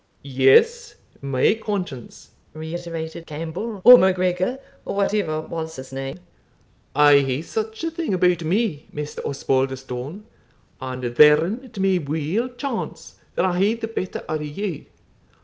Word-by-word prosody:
"Yes, 140 - +3 0.3
my 135 +5 +2
conscience," 180 - -5 0.2
reiterated 165 0 -6
Campbell, 165 +8 -5
or 250 +2 +11
MacGregor, 185 +4 +1 0.3
or - - -5
whatever 200 -6 0
was 160 0 -6
his 130 0 -10
name; 135 +2 -5 0.8
"I 145 -1 +7
hae 135 +2 -1
such 220 - -4
a 330 - -1
thing 330 - -3
about 180 -2 +2
me, 180 -2 -1
Maister 150 0 -6
Osbaldistone; 135 +4 -2 0.6
and 130 -1 -5
therein 150 - +5
it 250 -5 -15
may 190 -1 +2
weel 160 - -2
chance 250 -1 -6 0.2
that - - +2
I 180 -1 0
hae 205 +4 +3
the 230 -1 -5
better 190 -4 -4
o' 155 - -2
you. 150 +3 -5
165 Hz, 130 wpm, -22 LUFS, 145-205 Hz, 0.8 s, or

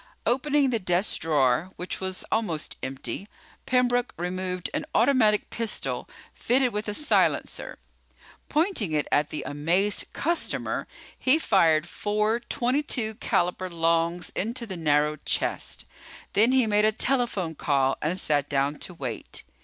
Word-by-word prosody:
Opening 275 +2 +2
the 230 - +1
desk 180 +1 +1
drawer, 155 +1 +2
which 180 - -4
was 190 -1 -4
almost 175 -9 -1
empty, 135 - -5 0.4
Pembroke 245 -1 +2
removed 180 +1 -3
an 305 +1 -1
automatic 230 -5 +3
pistol 230 -2 -3 0.2
fitted 250 0 +2
with 210 +1 -3
a 210 - -2
silencer. 300 - +1 0.7
Pointing 300 - +1
it 150 -1 0
at 145 0 +2
the 155 - -4
amazed 175 +8 +1
customer, 335 +3 -1 0.3
he 260 +4 +4
fired 170 - +3
four 210 +5 0
.22 240 -2 -1
caliber 180 +1 0
longs 170 +1 0
into 235 +4 -3
the 195 -4 -6
narrow 150 -2 +2
chest. - - -3 0.5
Then 225 +5 +5
he 260 -2 +4
made 210 0 +3
a 215 - +4
telephone 225 -8 0
call 135 -3 +1
and 170 +5 -1
sat 145 -3 +1
down 140 +1 0
to 180 - -6
wait. 125 -8 -5
190 Hz, 135 wpm, -26 LUFS, 160-240 Hz, 0.7 s, Then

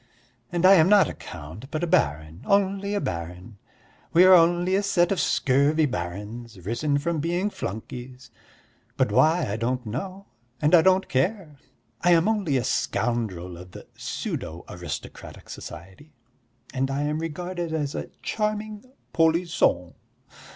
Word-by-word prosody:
And 175 +1 +1
I 190 - +9
am 175 -2 +5
not 205 -2 +6
a - - -5
count 85 - -10
but 155 +3 -3
a - - +3
baron, 80 - 0
only 200 0 +1
a - - +1
baron. 90 - -6 0.5
We 175 +2 +7
are 185 0 +8
only 175 +1 +4
a 195 - +3
set 185 -3 +2
of 195 - 0
scurvy 140 +4 +2
barons, 105 +2 -6
risen 140 +7 0
from 160 +2 -1
being 175 +6 -1
flunkeys, 125 - -7 0.7
but - - +1
why 160 +3 +4
I 105 +1 -3
don't 125 +2 -2
know 185 - -5 0.3
and 150 +2 +1
I 170 - +8
don't 190 +2 +3
care. 150 +1 -1 0.4
I 175 0 +5
am 170 +3 +4
only 200 -11 +1
a 125 - -1
scoundrel 105 -9 -2
of 90 0 -12
the - - -10
pseudo 80 +2 -5
aristocratic 90 0 -8
society, 95 - -11 0.6
and 135 0 -1
I 140 +1 -1
am 150 +1 -1
regarded 175 +1 -4
as 150 -3 -2
'a - - -4 0.2
charming 215 -1 -2 0.3
polis 165 +1 +2
son.' 90 - +1
150 Hz, 150 wpm, -25 LUFS, 115-180 Hz, 0.7 s, I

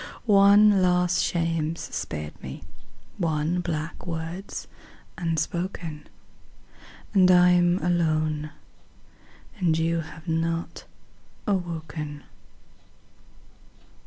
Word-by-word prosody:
One 200 -1 +6
last 180 0 +3
shame's 165 -1 -1
spared 75 -1 -5
me, - - -8 0.6
one 160 0 0
black 165 -1 -4
word's 170 +3 -5 0.5
unspoken; 165 -1 -3 1.0
And 185 -3 +5
I'm 180 -1 +5
alone; 155 -3 0 1.1
and 165 -4 +2
you 165 +1 +1
have 160 +1 -9
not 165 +1 -2 0.6
awoken. 160 -6 -3
170 Hz, 75 wpm, -25 LUFS, 160-180 Hz, 1.1 s, One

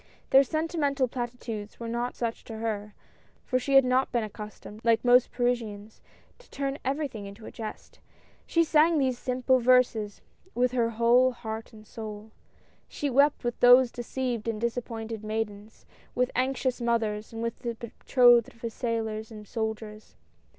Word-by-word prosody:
Their 270 +1 +8
sentimental 295 -2 0
platitudes 235 -4 -6
were 230 - -5
not 240 +2 -2
such 230 -1 -3
to 225 - -7
her, 210 -2 -4 0.5
for 255 - +1
she 275 +2 0
had 270 -1 +8
not 255 +1 +2
been 235 -2 0
accustomed, 210 0 -9
like 230 +1 +2
most 245 0 +5
Parisians, 225 -4 -2 0.4
to - - -20
turn 275 +1 -3
everything 265 -7 -3
into 200 +3 -11
a - - -8
jest. 220 -2 -8 0.5
She 335 - +3
sang 320 +1 +4
those 260 -3 +1
simple 255 0 +1
verses 235 -4 +2 0.3
with 250 0 +2
her 235 -2 +1
whole 235 +3 +4
heart 220 -1 -6
and 215 -2 -14
soul. 215 -1 -8 0.6
She 285 -2 -3
wept 280 +3 +3
with 240 -1 -2
those 245 0 +7
deceived 240 -2 -3
and 225 -2 -2
disappointed 225 -2 -4
maidens, 215 0 -5 0.3
with 250 0 +1
anxious 260 0 0
mothers, 225 -3 -1
and 225 0 -5
with 230 0 -3
the 235 -2 -4
betrothed 240 +1 +3
of 230 -1 -3
sailors 220 -2 -3
and 210 -2 -11
soldiers. 220 -1 -5
235 Hz, 155 wpm, -28 LUFS, 220-255 Hz, 0.6 s, Their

